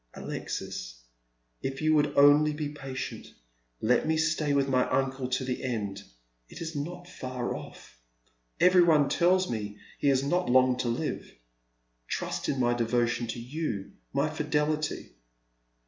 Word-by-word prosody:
" - - -43
Alexis, - - -5 0.6
if 135 0 -3
you 155 0 +3
would 150 -1 +2
only 145 +2 +6
be 150 -1 -3
patient! 135 -4 -7 0.5
Let 125 +6 +2
me 160 0 +2
stay 155 -2 +1
with 140 -1 +2
my 130 -2 +2
uncle 135 -1 0
to 130 +1 -1
the 125 -1 -3
end. 105 -6 -3 0.5
It - - -10
is 165 -1 -5
not 175 +5 -5
far 130 -8 -4
off. - - -11 0.6
Every 180 +1 +6
one 155 -5 +4
tells 185 +2 +3
me 105 -3 -4 0.2
he - - 0
has 135 -1 +3
not 175 +4 0
long 130 0 +5
to 125 - -1
live. 115 - -3 0.8
Trust - - -3
in 135 - 0
my 120 -1 +3
devotion 120 0 0
to 115 - -4
you, 120 -5 -4 0.2
_my - - 0
fidelity." 150 - -1
135 Hz, 150 wpm, -28 LUFS, 120-155 Hz, 0.8 s, only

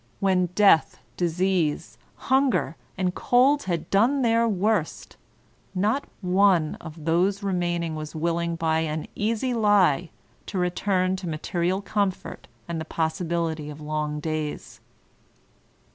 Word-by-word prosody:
When 185 -2 +2
death, 200 -6 +4 0.2
disease, 175 -2 -1 0.2
hunger, 265 -8 +1 0.2
and 185 -1 0
cold 270 +7 +3
had 170 -4 -2
done 250 +8 +3
their 230 0 +3
worst, 205 -4 -1 0.6
not 215 +9 +1 0.2
one 185 -4 +3
of 160 -1 -10
those 185 +5 +1
remain 175 -3 -1
ing 165 -1 -3
was 155 0 -6
willing 170 +1 -1
by 160 -1 +1
an 155 -1 -2
easy 230 +4 -1
lie 195 - +3 0.4
to 200 - -4
return 185 +1 0
to 185 -2 -5
material 175 +4 -1
com 205 -1 +1
fort 185 - -10 0.2
and 170 -2 -3
the - - -5
possibility 160 -1 -2
of 150 0 -9
long 150 0 -3
days. 155 -1 -4
180 Hz, 130 wpm, -25 LUFS, 160-200 Hz, 0.6 s, death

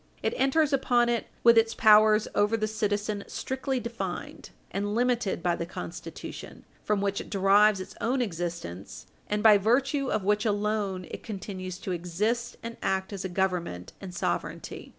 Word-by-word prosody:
It - - +1
enters 275 +3 +2
upon 245 -3 +3
it 235 -1 -1 0.2
with 235 -1 +8
its 225 0 0
powers 215 0 +6
over 210 +2 +2
the 215 - 0
citizen 210 -1 -1
strictly 265 0 -3
defined, 230 -7 -6 0.2
and 205 +2 -2
limited 240 -7 0
by 175 -1 +2
the 170 - -4
Constitution, 90 - -8 0.2
from 210 -2 0
which 200 0 -1
it - - -11
derives 200 +1 +4
its 185 - -7
own 255 +3 +1
existence 170 - -4 0.2
and 210 0 0
by 210 -2 +8
virtue 270 +6 +2
of 215 - 0
which 210 +2 +2
alone 205 -3 -1
it - - -6
continues 185 -3 -6
to 185 - -5
exist 205 +8 -2
and 230 0 -6
act 190 +1 -1
as 195 - -5
a 190 - -3
Government 175 - -2
and 190 -2 -7
sovereignty. 180 - -4
210 Hz, 165 wpm, -28 LUFS, 190-230 Hz, 0.2 s, with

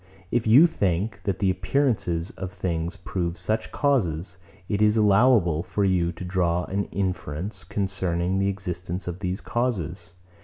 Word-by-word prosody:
If 115 -2 +1
you 130 +10 +8
think, 100 - 0
that 100 -4 0
the 95 -2 +2
appearances 95 -9 0
of 95 -1 -6
things 85 -1 -2
prove 85 -1 -3
such 110 +5 -2
causes, 95 - 0 0.3
it 105 -1 -1
is 105 +1 +4
allowable 105 -6 +4
for 100 +3 -2
you 90 -3 +2
to 90 +2 -7
draw 90 -1 +1
an 100 +2 -2
inference 95 0 -3
concerning 95 -2 -1
the 95 - +2
existence 90 -2 -5
of 90 +1 -4
these 90 +1 -3
causes. 100 -7 -2
95 Hz, 150 wpm, -25 LUFS, 85-105 Hz, 0.3 s, you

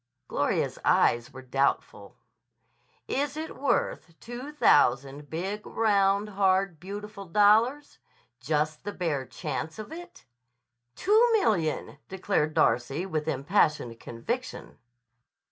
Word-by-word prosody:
Gloria's - - -1
eyes 120 0 +3
were 130 0 -11
doubtful. 135 +2 -1 0.9
"Is 285 +2 -2
it 320 +1 -5
worth 180 - -1
two 245 +5 -8
thousand 140 - +2
big, 195 +6 -4
round, 200 -1 +1
hard, 190 -3 +1
beautiful 200 +2 -8
dollars? 215 +9 +3 0.4
Just 150 +3 -1
the 205 0 -5
bare 150 -9 -2
chance 155 +4 -5
of 215 +6 -8
it?" 345 +2 -11 0.7
"Two 430 +4 +4
million," 175 - 0
declared 185 -5 -1
Darcy 135 +8 +1
with 155 -5 -3
impassioned 140 - +1
conviction. 115 0 -6
190 Hz, 105 wpm, -27 LUFS, 150-215 Hz, 0.9 s, Two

